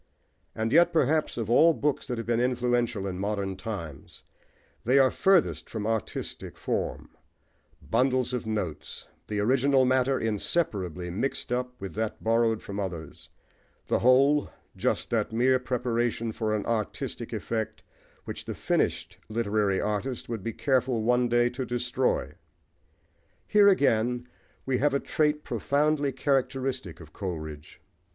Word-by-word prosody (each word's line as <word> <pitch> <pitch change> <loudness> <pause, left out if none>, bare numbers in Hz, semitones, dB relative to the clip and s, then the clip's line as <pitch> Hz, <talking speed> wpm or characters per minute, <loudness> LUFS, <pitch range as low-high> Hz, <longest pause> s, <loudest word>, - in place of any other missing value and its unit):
And 110 +2 -1
yet, 170 +2 +6
perhaps, 155 -3 +1
of 115 -3 -2
all 160 +8 +5
books 145 -1 -1
that 125 - -3
have 115 - -4
been 120 0 +1
influential 120 -4 0
in 95 -2 -4
modern 100 -1 -2
times, 85 -10 -7 0.6
they 125 +4 +3
are 130 -2 +5
furthest 190 -3 +2
from 110 -2 -4
artistic 110 -2 -3
form - - -3 0.8
bundles 130 -1 +1
of 125 -3 -3
notes; 90 -9 -4 0.2
the 105 -1 -2
original 130 +4 +3
matter 130 +1 +2
inseparably 100 - -1
mixed 125 +7 -2
up 125 0 -2
with 95 -3 -6
that 110 0 -3
borrowed 115 -1 +2
from 100 0 -5
others; 85 -6 -6 0.6
the - - +1
whole, 135 +4 +4 0.3
just - - -1
that - - 0
mere 130 +3 +3
preparation 120 -2 -1
for 110 -1 -1
an 105 - -2
artistic 110 -3 -3
effect 110 -2 -3 0.4
which - - -6
the - - -5
finished - - -1
literary 105 -3 +1
artist 105 +5 -2
would 115 -3 -4
be 115 - -3
careful 125 -2 +1
one 125 +1 +2
day 120 0 +3
to 125 +2 -4
destroy. 125 +1 -1 1.1
Here, 205 -1 +5
again, 125 - +2 0.4
we 130 -1 0
have 145 0 +2
a - - +2
trait 150 0 0
profoundly 145 0 +1
characteristic 135 - -1
of 80 -1 -14
Coleridge. 80 -6 -6
120 Hz, 140 wpm, -27 LUFS, 105-130 Hz, 1.1 s, yet